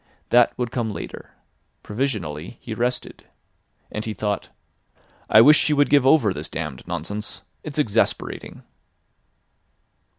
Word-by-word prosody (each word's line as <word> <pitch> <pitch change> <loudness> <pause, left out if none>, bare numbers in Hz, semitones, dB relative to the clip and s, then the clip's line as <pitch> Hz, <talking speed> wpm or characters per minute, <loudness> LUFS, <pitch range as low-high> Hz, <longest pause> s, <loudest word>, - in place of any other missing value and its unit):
That 120 0 +5
would 125 -2 -2
come 120 -3 -1
later. 105 - -8 0.5
Provisionally 105 - -3
he 115 - -6
rested. 125 +3 -3 0.7
And 105 - -4
he 110 -1 -4
thought: 105 +1 -2 0.8
"I 110 - +8
wish 150 +6 +8
she 155 - +2
would 145 0 +3
give 140 -3 +5
over 130 -10 +5
this 75 -3 -5
damned 75 -5 -6
nonsense. 105 -3 -5 0.2
It's 150 -2 -7
exasperating." 115 -6 -1
110 Hz, 125 wpm, -23 LUFS, 100-130 Hz, 0.8 s, I